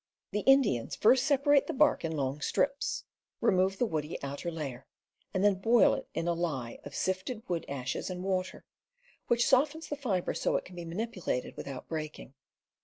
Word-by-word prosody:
The 210 - 0
Indians 245 - +3
first 255 +4 +4
separate 285 0 +4
the - - -2
bark 300 +2 +4
in 160 -1 -2
long 140 +1 -2
strips, 275 - 0 0.4
remove 190 0 +2
the 245 - +2
woody 155 -6 -3
outer 140 +5 -4
layer, 140 -6 -6 0.4
and 190 - 0
then 205 -1 +6
boil 225 +5 +4
it - - -4
in 165 +1 -1
a 170 - +2
lye 145 -9 -3
of - - -9
sifted 190 +5 -2
wood 170 -2 -2
ashes 135 +2 -3
and 180 0 -5
water, 185 -1 -2 0.6
which 240 0 +3
softens 295 +5 +2
the 295 - -2
fiber 215 -11 -1
so - - 0
it - - -1
can 185 - -12
be 175 -1 -6
manipulated 180 - -3
without 135 -2 -7
breaking. 155 -4 -6
185 Hz, 180 wpm, -30 LUFS, 155-240 Hz, 0.6 s, then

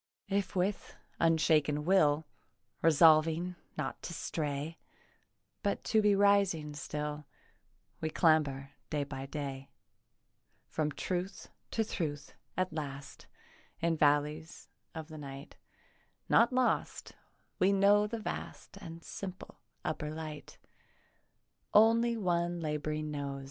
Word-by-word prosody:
If 200 -1 -1
with 190 +2 -1 0.2
unshaken 155 -2 +3
will, 160 -5 +4 0.6
Resolving 165 +2 +5 0.2
not 140 -3 -3
to 170 - -6
stray 150 +1 -3 0.8
But 200 - -1
to 220 - +3
be 210 -1 +4
rising 195 -7 +3
still, 150 0 -4 0.7
We 160 - -1
clamber 145 -4 +2 0.2
day 150 -2 0
by 135 -1 -6
day 140 -2 -5 1.0
From 155 -1 -1
truth 180 +4 -4 0.2
to 225 - 0
truth, 150 -8 -4 0.2
at 185 -2 0
last, 140 -3 -6 0.5
In 165 0 +1
valleys 150 +2 +1 0.3
of 160 -1 -6
the 155 -1 -9
night 140 0 -9 0.7
Not 235 +2 +5
lost, 255 -1 0 0.5
we 190 +2 +4
know 200 +1 +5
the 230 +2 -4
vast 220 - -6
And 165 0 -9
simple 190 -2 -8 0.3
upper 150 -1 -2
light, 155 -1 -7 1.2
Only 230 +2 +5
one 175 -3 0
labouring 155 -1 -2
knows. 140 -1 -4
160 Hz, 110 wpm, -32 LUFS, 150-185 Hz, 1.2 s, Resolving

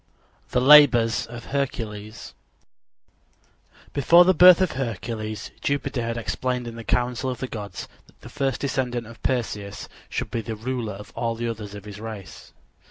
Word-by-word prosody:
THE - - +1
LABORS 130 -5 +6
OF 120 0 -9
HERCULES 110 -6 -4 1.6
Before 170 +6 +6
the 185 - +5
birth 180 +1 +8
of 185 -3 +1
Hercules 110 -3 -4
Jupiter 140 -3 -1
had 115 0 -3
explained 125 +1 -2
in 115 - -7
the 115 - -8
council 125 +2 0
of 125 - -3
the - - -4
gods 100 -6 -7 0.2
that - - -25
the - - -11
first 135 0 -2
descendant 125 -4 -2
of 115 +1 -13
Perseus 105 -6 -3 0.2
should - - -4
be 115 - -2
the 110 0 -5
ruler 115 -1 -4
of 105 +1 -11
all 115 0 -1
the 120 +1 -3
others 105 -3 -6
of 100 0 -10
his 105 -1 -9
race. 105 -7 -9
120 Hz, 165 wpm, -24 LUFS, 110-130 Hz, 1.6 s, birth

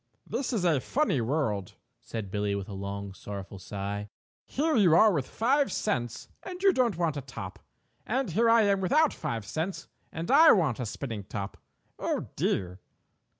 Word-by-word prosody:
"This 245 +5 -2
is 210 -7 0
a 155 -6 +3
funny 255 - +1
world," 110 - -1 0.2
said 105 -4 -6
Billie 105 -1 0
with 100 -1 -4
a 105 - -7
long, 100 0 -5
sorrowful 100 0 -8
sigh. 100 +2 -5 0.4
"Here 310 +3 0
you 185 -8 +5
are 215 +3 +6
with 140 -6 -1
five 275 +5 +2
cents 120 - -2
and 365 -1 -7
you 390 -1 +6
don't 240 - +2
want 165 -4 0
a - - -3
top, 110 -8 -8 0.4
and 250 -3 -1
here 230 +7 +3
I 230 -1 +6
am 200 -1 +2
without 300 - +3
five 115 -3 -4
cents 165 - -3 0.2
and 165 +6 -4
I 310 +4 +8
do - - +9
want 155 - +1
a 125 - -2
spinning 110 -4 -5
top. 100 -1 -5 0.4
Oh, - - -2
dear!" 90 0 -1
145 Hz, 180 wpm, -29 LUFS, -, 0.4 s, do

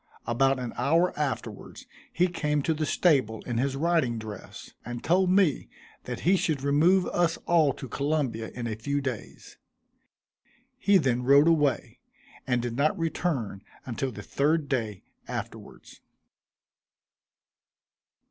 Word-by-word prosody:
About 135 +3 +2
an 125 -2 -5
hour 165 +8 +2
afterwards 145 -3 -4 0.3
he 180 - +2
came 150 -4 -1
to 160 - +1
the 155 -1 -2
stable 130 -13 +2
in 120 -2 -2
his 135 +1 0
riding 155 -6 +1
dress; 110 -3 -9
and 120 0 -6
told 180 +2 +3
me 185 -6 +2 0.4
that - - -5
he 185 +4 +4
should 150 -6 -1
remove 165 +7 +4
us 170 -2 +1
all 160 -4 +4
to 130 - -8
Columbia 135 -4 -2
in 120 -1 -4
a 110 -2 -3
few 140 +6 -2
days. 130 -6 -7 1.2
He 200 -4 +4
then 130 -7 +1
rode 140 +4 +5
away, 150 -4 +1 0.5
and 125 -2 +1
did 120 -1 -3
not 155 +9 +1
return 155 - -2 0.2
until 130 +2 -3
the - - -9
third 150 +1 0
day 110 -8 -2 0.2
afterwards. - - -8
140 Hz, 135 wpm, -27 LUFS, 120-165 Hz, 1.2 s, rode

